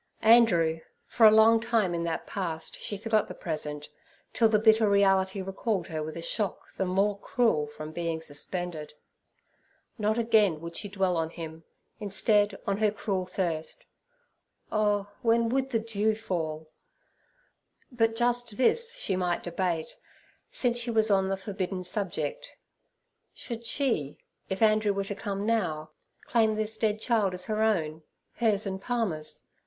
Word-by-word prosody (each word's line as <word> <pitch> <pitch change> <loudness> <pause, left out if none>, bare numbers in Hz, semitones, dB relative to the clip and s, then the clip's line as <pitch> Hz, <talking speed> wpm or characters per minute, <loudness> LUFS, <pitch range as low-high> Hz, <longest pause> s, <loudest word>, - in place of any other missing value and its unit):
Andrew—for 220 -1 +4
a - - +10
long 220 +1 +6
time 225 -6 +1
in 170 0 -2
that 165 -1 -3
past 165 -5 -5
she 205 - -3
forgot 215 +1 +1
the - - -8
present, 150 -2 -4 0.5
till 225 -2 +4
the 215 - +4
bitter 220 0 +4
reality 195 -1 +3
recalled 195 0 -2
her 160 -3 -4
with 155 +2 -5
a 165 - -6
shock 205 +3 -3
the 190 - -1
more 200 +2 +1
cruel 225 - +1
from 155 +1 -8
being 165 0 -2
suspended. 160 +1 -3 1.0
Not 215 +1 +1
again 215 -8 +3
would 170 +1 -8
she 205 - -4
dwell 190 -2 0
on 160 -1 -1
him; 160 -1 -9 0.3
instead, 205 0 +2
on 200 -1 0
her 215 0 +3
cruel 200 -3 -3
thirst—oh, 205 - -4
when 230 0 +2
would 265 +2 0
the 240 - +1
dew 220 -1 0
fall? 160 -7 -4 1.2
But 225 -2 +1
just 240 -2 0
this 465 - +1
she 205 - -1
might 180 -1 -1
debate, 175 -2 -2 0.5
since 240 -1 0
she 240 0 -2
was 220 -2 +3
on 190 -1 +3
the 195 - -1
forbidden 190 -1 -4
subject—should 230 - -6
she, 230 - -1 0.3
if 190 +3 -1
Andrew 215 -1 +3
were 200 0 -1
to 195 - -4
come 200 -1 -4
now, 175 -9 -1 0.3
claim 220 -2 +2
this 215 0 -2
dead 215 -1 +1
child 215 -5 +1
as 180 - -4
her 215 0 -1
own—hers 200 +3 -1
and 190 -1 -4
Palmer's? 195 -12 -3
200 Hz, 145 wpm, -28 LUFS, 175-225 Hz, 1.2 s, a